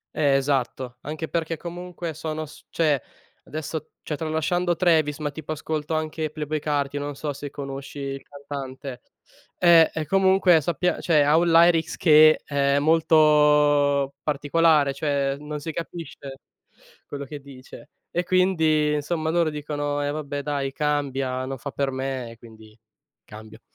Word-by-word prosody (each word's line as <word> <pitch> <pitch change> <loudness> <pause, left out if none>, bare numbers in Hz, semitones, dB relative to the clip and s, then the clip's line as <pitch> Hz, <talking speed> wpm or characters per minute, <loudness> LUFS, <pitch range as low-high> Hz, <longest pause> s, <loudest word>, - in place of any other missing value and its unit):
Eh 145 -3 +3
esatto. 130 -2 -1
Anche 155 +2 -5
perché 165 -1 -2
comunque 175 0 -7
sono 155 +1 -4
s 150 - -15
cioè 150 -5 +1 0.4
adesso, 155 0 -6
cioè 150 - -4
tralasciando 165 +3 0
Travis, 160 -4 +2
ma 150 -1 -3
tipo 155 +1 -6
ascolto 155 0 -4
anche 155 0 -2
Playboi 155 0 -3
Carti, 145 -1 -1
non 145 0 -4
so 150 +1 -4
se 145 +1 -7
conosci 140 0 -7
il 135 0 -5
cantante. 140 -2 -8 0.6
Eh, 170 -2 +6
e 160 -1 -3
comunque 190 -1 +4
sappia 175 +3 -1
cioè 155 -4 +3
ha 150 +2 +4
un 170 +1 +2
lyrics 165 -1 +4
che 155 -1 +6
è 140 -1 +1
molto 150 -3 +4
particolare, 150 0 +2
cioè 140 -1 -1
non 150 0 -6
si 160 - -4
capisce 160 -5 -8 0.7
quello 140 -1 -6
che 145 +1 -8
dice. 140 +1 -13 0.2
E 175 - 0
quindi, 160 -5 +2
insomma, 155 +2 -2
loro 170 -1 +2
dicono: 145 -1 -3
"Eh 145 - -1
vabbè, 145 -1 -4
dai, 140 -2 -2
cambia, 135 -3 -1
non 135 +1 -5
fa 140 +3 -6
per 140 0 -1
me." 130 -3 -4
Quindi 110 -2 -16 0.5
cambio. 110 0 -13
150 Hz, 145 wpm, -24 LUFS, 140-160 Hz, 0.7 s, Eh